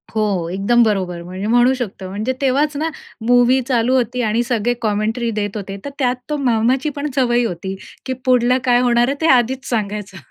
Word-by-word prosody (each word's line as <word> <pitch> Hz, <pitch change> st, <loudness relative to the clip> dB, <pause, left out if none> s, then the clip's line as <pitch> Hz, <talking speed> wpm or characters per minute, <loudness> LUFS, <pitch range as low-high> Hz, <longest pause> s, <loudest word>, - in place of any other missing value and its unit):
हो. 200 Hz, -6 st, 0 dB
एकदम 235 Hz, +5 st, +3 dB
बरोबर 185 Hz, -5 st, -1 dB
म्हणजे 185 Hz, +3 st, -5 dB
म्हणू 245 Hz, +3 st, +4 dB
शकतो. 215 Hz, -7 st, -5 dB
म्हणजे 215 Hz, +7 st, -2 dB
तेव्हाचं 280 Hz, +2 st, +1 dB
ना 320 Hz, +1 st, 0 dB, 0.4 s
मूवी 245 Hz, +1 st, +5 dB
चालू 250 Hz, 0 st, +2 dB
होती 250 Hz, 0 st, 0 dB
आणि 225 Hz, +1 st, +1 dB
सगळे 240 Hz, 0 st, 0 dB
कॉमेंटरी 220 Hz, +2 st, -1 dB
देत 205 Hz, 0 st, -3 dB
होते. 195 Hz, -1 st, -6 dB
तर -, -, -3 dB
त्यात 250 Hz, -1 st, +1 dB
तो 300 Hz, -, -1 dB
मामाची 255 Hz, +2 st, +1 dB
पण 290 Hz, +1 st, -3 dB
सवय 245 Hz, -2 st, +2 dB
होती 190 Hz, -1 st, -4 dB, 0.3 s
की 260 Hz, -, -2 dB
पुढलं 250 Hz, 0 st, +3 dB
काय 245 Hz, -2 st, +4 dB
होणार 240 Hz, -1 st, +3 dB
आहे 275 Hz, -, -1 dB
ते 320 Hz, -, +2 dB
आधीच 260 Hz, +2 st, +2 dB
सांगायचं. 210 Hz, -4 st, -3 dB
240 Hz, 185 wpm, -19 LUFS, 210-255 Hz, 0.4 s, मूवी